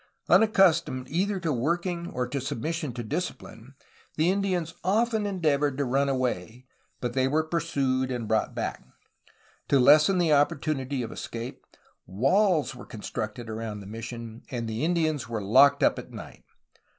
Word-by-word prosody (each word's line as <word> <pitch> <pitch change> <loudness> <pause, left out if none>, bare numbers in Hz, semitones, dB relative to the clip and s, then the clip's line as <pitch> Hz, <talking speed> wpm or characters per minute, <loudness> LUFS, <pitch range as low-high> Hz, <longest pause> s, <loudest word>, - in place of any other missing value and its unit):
Unaccustomed 170 -11 +4
either 190 +4 0
to 165 -4 -1
working 170 +6 -1
or 125 -7 -3
to 135 +2 -3
submission 155 +4 -3
to 120 0 -6
discipline 135 -3 -6 0.4
the 160 +4 +3
Indians 185 -4 -1
often 220 +2 +1
endeavored 150 -7 0
to 140 - 0
run 135 +3 +1
away, 125 -3 -2 0.3
but 120 0 -3
were 135 +4 +2
pursued 140 -6 -1
and 120 -3 -3
brought 110 0 0
back. - - -3 0.8
To 140 - +4
lessen 155 +8 +6
the 170 -4 +3
opportunity 145 -3 0
of 115 - -6
escape, 120 +2 -7 0.4
walls 150 - +2
were 125 - -11
constructed 110 +2 -5
around 110 -1 -5
the 100 - -10
mission, 115 +2 -7
and 120 -3 -4
the 110 +3 -3
Indians 155 -6 0
were 115 -2 -2
locked 140 +7 +5
up - - +3
at - - -10
night. - - -11
140 Hz, 150 wpm, -27 LUFS, 120-165 Hz, 0.8 s, lessen